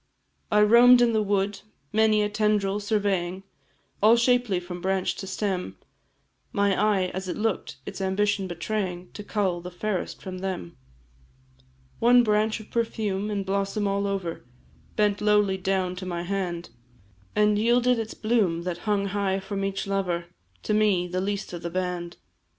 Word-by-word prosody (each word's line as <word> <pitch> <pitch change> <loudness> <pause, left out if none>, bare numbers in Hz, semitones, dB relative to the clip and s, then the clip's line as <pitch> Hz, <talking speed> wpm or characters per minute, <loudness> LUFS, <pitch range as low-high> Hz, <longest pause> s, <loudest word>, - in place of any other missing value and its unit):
I 210 0 +5
roam'd 240 +4 +7
in 240 -1 +4
the 220 - +2
wood, 200 -1 0 0.3
many 215 -1 +4
a - - +1
tendril 210 -1 +1
surveying, 195 -3 -1 0.6
All 220 +3 +7
shapely 240 -5 +2
from 175 0 -8
branch 190 0 0
to 195 - -6
stem, 185 - -3 0.7
My 200 0 +2
eye, 195 -3 +1
as 190 +1 -4
it 180 - -3
look'd, 220 -2 -2
its - - -6
ambition 195 +1 0
betraying 180 0 -3
To 210 - -8
cull 195 -5 -1
the 180 - -7
fairest 185 +1 -3
from 185 -1 -7
them; 185 - -4 1.2
One 245 +1 +6
branch 215 0 +1
of 215 - -13
perfume, 215 -3 -1
in 205 -2 -2
blossom 200 +2 -1
all 200 0 0
over, 190 -4 -3 0.5
Bent 210 -1 +1
lowly 210 -2 +3
down 185 -1 0
to 185 - -6
my 175 -1 -3
hand, 175 -2 -3 0.6
And 210 0 +3
yielded 240 +2 +3
its 225 -1 -5
bloom, 210 -7 +1
that 175 -1 -3
hung 200 -1 +2
high 195 -1 0
from 195 0 -4
each 195 0 -2
lover, 185 -3 -1 0.4
To - - -1
me, 205 -4 +2
the 180 +1 -2
least 200 0 -3
of 175 - -5
the 170 - -4
band. 180 -1 -3
200 Hz, 160 wpm, -26 LUFS, 185-210 Hz, 1.2 s, roam'd